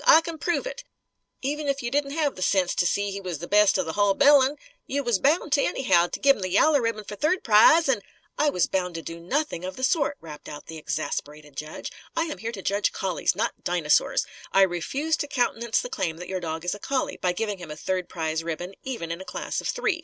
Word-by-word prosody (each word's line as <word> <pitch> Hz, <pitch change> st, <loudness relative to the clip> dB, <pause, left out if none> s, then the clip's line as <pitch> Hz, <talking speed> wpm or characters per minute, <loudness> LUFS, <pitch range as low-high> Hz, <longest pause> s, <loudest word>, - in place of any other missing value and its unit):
I 320 Hz, -, +9 dB
c'n 330 Hz, -1 st, -6 dB
prove 345 Hz, +8 st, 0 dB
it. -, -, -6 dB, 0.6 s
Even 295 Hz, +2 st, -2 dB
if 275 Hz, -2 st, -1 dB
you 240 Hz, -, -2 dB
didn't 280 Hz, 0 st, 0 dB
have 295 Hz, -3 st, +1 dB
the -, -, -9 dB
sense 185 Hz, -1 st, +2 dB
to 175 Hz, -, +2 dB
see 200 Hz, +2 st, 0 dB
he 200 Hz, 0 st, -5 dB
was 180 Hz, -4 st, -4 dB
the 170 Hz, +4 st, -7 dB
best 210 Hz, 0 st, +5 dB
of 185 Hz, -, 0 dB
the 160 Hz, -, -4 dB
hull 205 Hz, -1 st, +3 dB
bilin', 280 Hz, +2 st, +5 dB, 0.3 s
you 280 Hz, +1 st, -1 dB
was 240 Hz, -6 st, +1 dB
bound, 295 Hz, -, +2 dB
anyhow, 175 Hz, -11 st, +3 dB
to -, -, -6 dB
give 275 Hz, 0 st, +5 dB
him -, -, -9 dB
the 185 Hz, -, -2 dB
yaller 285 Hz, -, +4 dB
ribbon 230 Hz, -2 st, -1 dB
fer 205 Hz, -, -7 dB
third 310 Hz, -, +1 dB
prize. 235 Hz, +10 st, +6 dB
An 250 Hz, -6 st, +2 dB, 0.2 s
" -, -, -36 dB
"I 300 Hz, -, +4 dB
was 180 Hz, -, +2 dB
bound 180 Hz, -2 st, -2 dB
to 165 Hz, -, -5 dB
do 165 Hz, 0 st, -7 dB
nothing 185 Hz, -, -2 dB
of 185 Hz, 0 st, -5 dB
the 260 Hz, -, -7 dB
sort!" 285 Hz, 0 st, +2 dB
rapped 150 Hz, -2 st, -10 dB
out 150 Hz, -, -9 dB
the 160 Hz, -1 st, -8 dB
exasperated 150 Hz, -1 st, -4 dB
judge. 155 Hz, +2 st, -6 dB, 0.2 s
"I 330 Hz, -, +2 dB
am 310 Hz, -2 st, -5 dB
here 230 Hz, +1 st, -3 dB
to 195 Hz, -5 st, -8 dB
judge 200 Hz, +1 st, +1 dB
collies, 190 Hz, -2 st, 0 dB
not -, -, -2 dB
dinosaurs. 170 Hz, -4 st, +2 dB, 0.3 s
I 195 Hz, -, +6 dB
refuse 265 Hz, -, 0 dB
to 290 Hz, -, -3 dB
countenance 240 Hz, -4 st, 0 dB
the -, -, -5 dB
claim 180 Hz, -9 st, -2 dB
that 180 Hz, -, -8 dB
your 190 Hz, -1 st, -2 dB
dog 165 Hz, -1 st, -4 dB
is 180 Hz, -, 0 dB
a 205 Hz, -, -7 dB
collie, 270 Hz, +5 st, -2 dB
by 180 Hz, -, 0 dB
giving 205 Hz, +1 st, -3 dB
him 175 Hz, -3 st, -9 dB
a 150 Hz, -, -6 dB
third 185 Hz, +2 st, -2 dB
prize 160 Hz, -1 st, -2 dB
ribbon; 170 Hz, +3 st, -4 dB
even 230 Hz, -11 st, -5 dB
in 170 Hz, +2 st, -5 dB
a -, -, -6 dB
class -, -, -4 dB
of -, -, -4 dB
three. 435 Hz, -7 st, 0 dB
205 Hz, 250 wpm, -25 LUFS, 175-280 Hz, 0.6 s, I